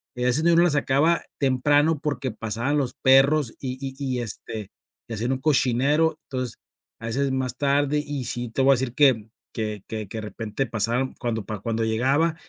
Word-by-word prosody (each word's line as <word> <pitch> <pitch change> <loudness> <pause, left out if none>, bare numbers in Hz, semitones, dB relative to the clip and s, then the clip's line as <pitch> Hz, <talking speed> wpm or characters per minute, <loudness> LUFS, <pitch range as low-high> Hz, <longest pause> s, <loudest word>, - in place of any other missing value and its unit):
en 125 0 0
ese 130 +5 +3
tiempo 170 0 +4
no - - +6
la - - +4
sacaba 145 +4 +2 0.2
temprano 145 +3 +3
porque 140 -5 -2
pasaban 115 +7 -2
los 135 -4 -1
perros 135 0 +4
y 130 -1 -4
y 135 -1 -5
y 130 -3 -2
este, 110 -2 -6 0.4
y - - -4
hacían 120 +5 -1
un 130 - -3
cochinero, 145 +3 +2
entonces 130 -3 -4 0.4
a 115 - -6
veces 135 +4 0
más 130 -2 -2
tarde. 145 +1 +2
Y 140 -3 -4
sí, 120 0 -3
te 125 - -1
voy 135 - +6
a - - +7
decir 125 -1 -2
que 130 -7 +4 0.3
que 105 -3 -3
que 110 -2 -5
que 110 - -7
de - - -5
repente 110 +4 -4
pasaron, 120 +4 0
cuando 115 -5 -2
pa 105 -2 -5
cuando 115 +1 -1
llegaba 135 +9 +2
130 Hz, 195 wpm, -24 LUFS, 115-145 Hz, 0.4 s, a